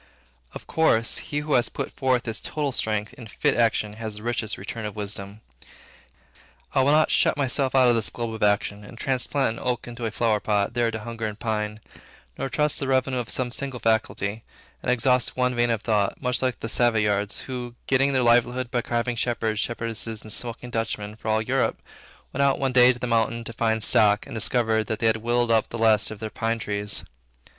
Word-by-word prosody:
Of - - -9
course, 115 -8 +2
he 145 0 -1
who 150 0 -2
has 120 - +3
put - - -5
forth 130 -2 0
his 115 -2 -4
total 150 -2 -2
strength 110 -3 -1
in 120 - -11
fit - - 0
actions, 110 -2 +1
has 110 -2 -5
the 105 - -8
richest 120 -2 -2
return 115 - -6
of 105 0 -5
wisdom. 100 0 -6 1.3
I - - +4
will 135 +2 +3
not 155 +1 +4
shut - - +3
myself 135 -1 0
out 130 -1 +6
of 120 - +5
this 115 -2 0
globe 115 -2 -4
of 110 - -7
action, 105 0 +1
and 115 +3 -12
transplant 130 -1 -1
an - - -9
oak 125 -1 -2
into 120 -1 -4
a - - -1
flower 110 -1 +1
pot, 105 0 0
there 120 -1 +1
to 110 -1 -5
hunger 115 0 -4
and 105 -1 -6
pine; 105 -2 -2 0.5
nor 135 - -3
trust 150 +1 +1
the 135 - -2
revenue 130 -1 +1
of 120 - -5
some 125 -1 -2
single 135 0 -3
faculty, 110 -1 0 0.4
and - - -3
exhaust 125 0 +2
one 125 0 +2
vein 120 0 +1
of 115 -2 -1
thought, 105 -3 +1
much 125 -1 -1
like 130 -1 -1
those 115 - -2
Savoyards, 105 -4 +1
who, 125 -2 -6
getting 135 +1 +3
their 130 -2 +2
livelihood 120 +1 +2
by 120 - +1
carving 120 +1 -1
shepherds, 115 -2 -1
shepherdesses, 115 -1 -3
and 110 - -6
smoking 120 0 -2
Dutchmen, 105 -2 -3
for 110 - -10
all 110 0 +2
Europe, 130 +3 0 0.5
went 140 - -1
out 140 -1 +3
one 135 -1 -1
day 125 0 +7
to 125 - -5
the 125 - -4
mountain 115 0 0
to 115 - -7
find 110 -1 0
stock, 105 0 +4
and - - -10
discovered 110 -1 +1
that 110 - -2
they 115 - -2
had 110 0 +3
whittled 120 +1 0
up 110 -1 +2
the 115 - -5
last 110 -2 +3
of 110 - -8
their 110 -1 -5
pine 115 0 -1
trees. 105 -1 0
115 Hz, 215 wpm, -25 LUFS, 110-125 Hz, 1.3 s, day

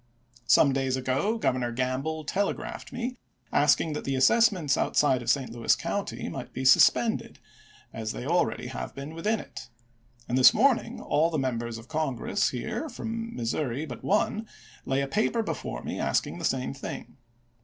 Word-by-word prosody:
Some 140 +2 +5
days 135 -1 0
ago 130 - 0
Governor 125 - 0
Gamble 130 +6 -2
telegraphed 195 +6 -3
me, 245 0 -4 0.4
asking 150 +2 +3
that 150 - -4
the 135 - -1
as 130 - +4
sessments 190 - +3
outside 135 -4 +2
of 120 - -4
St. 130 -2 +1
Louis 115 0 +2
County - - -3
might - - -7
be 130 +1 -4
sus 130 - +8
pended, 230 -2 -3 0.6
as 110 -1 -4
they 120 - -6
already 170 -4 +1
have - - -6
been 140 +3 -7
within 210 +7 0
it; - - -10 0.6
and 125 +2 +1
this 130 - +8
morning 245 0 +2
all 155 +3 +2
the 160 - -2
Members 120 -4 -2
of 115 +1 -12
Congress 155 -7 0
here 220 - -4
from 230 -1 -5
Missouri 125 +4 -2
but 125 -6 -8
one, 215 +2 +1 0.4
lay 135 +1 +1
a 140 - -1
paper 220 +7 +1
before - - -5
me - - -4
asking - - 0
the - - -3
same - - -1
thing. - - -8
145 Hz, 170 wpm, -27 LUFS, 130-210 Hz, 0.6 s, sus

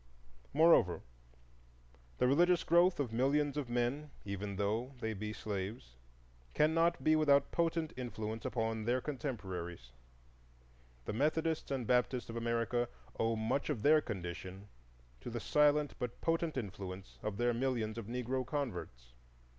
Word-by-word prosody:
Moreover, 155 - +5 1.1
the - - +2
religious 175 +6 +4
growth 175 +1 +4
of 125 -6 -1
millions 140 +4 +2
of 145 -4 -3
men, 125 +5 -1 0.2
even 100 0 -4
though 110 +7 -1
they 110 -2 -2
be 105 +1 -4
slaves, 100 - -5 0.6
cannot 165 +2 +3
be 155 - +5
without 140 -3 +4
potent 165 -2 0
influence 115 -3 -4
upon 110 -2 -1
their 125 +2 +2
contemporaries. 95 - -5 1.1
The - - -3
Methodists 155 +5 0
and 135 -3 -2
Baptists 125 0 +1
of - - -8
America 115 +1 0 0.3
owe 115 0 +2
much 110 +7 -1
of 125 -8 -2
their 155 +1 +6
condition 95 -1 -6 0.5
to - - -7
the 120 0 -3
silent 150 +5 +3
but 120 -1 -4
potent 165 -2 0
influence 95 -4 -6
of 105 -2 -3
their 120 +1 +2
millions 115 -3 -1
of 110 - -7
Negro 125 +2 -2
converts. 120 - -5
120 Hz, 135 wpm, -34 LUFS, 105-145 Hz, 1.1 s, their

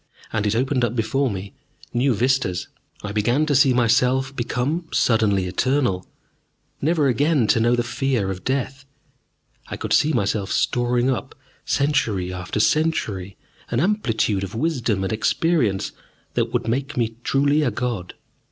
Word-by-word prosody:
And 105 -2 0
it 105 - +1
opened 130 +1 +1
up 120 0 0
before 130 +4 0
me 100 +2 -6 0.4
new 125 0 +2
vistas. 125 -5 0 0.4
I 105 - -4
began 120 +8 +1
to 150 - 0
see 135 0 +5
myself 125 +3 +2
become 130 +8 -2
suddenly 105 -5 +2
eternal, 120 0 0 0.8
never 155 -1 +2
again 140 +1 +2
to - - +4
know 120 +2 +3
the 120 - 0
fear 120 -5 -1
of 90 -1 -7
death. 135 0 -2 0.8
I - - -6
could - - -2
see 155 - +4
myself 100 -5 -1
storing 120 +1 +1
up, 125 - -4 0.3
century 105 -11 0
after 90 +3 -4
century, 105 - 0 0.3
an 120 - 0
amplitude 115 - +1
of 95 +2 -6
wisdom 120 -8 0
and 95 - -1
experience 110 - +1 0.4
that - - 0
would - - -1
make 135 +4 -2
me 115 -2 -1
truly 145 +2 +2
a 150 - +2
god. 120 -8 -4
120 Hz, 150 wpm, -22 LUFS, 105-135 Hz, 0.8 s, see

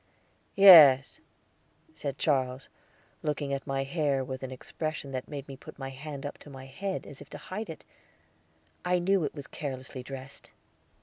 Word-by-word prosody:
"Yes," 160 - +9 0.7
said 140 - -5
Charles, 130 -3 0 0.5
looking 145 -2 -2
at 135 - -4
my 135 0 -1
hair 140 -2 0
with 130 0 -6
an 130 - -5
expression 145 +2 -5
that 130 0 -4
made 145 -2 -7
me 135 - -8
put 135 - -13
my 135 -1 -5
hand 140 +1 -8
up 145 - -6
to - - -13
my 130 -1 -10
head 190 +9 -4
as 140 - -11
if - - -13
to - - -8
hide 185 +7 -6
it; 160 - -9 1.0
I 180 0 +2
knew 185 +1 +2
it 150 - -3
was 145 -2 -7
carelessly 130 -4 -6
dressed. 135 +1 -10
140 Hz, 170 wpm, -29 LUFS, 135-155 Hz, 1.0 s, Yes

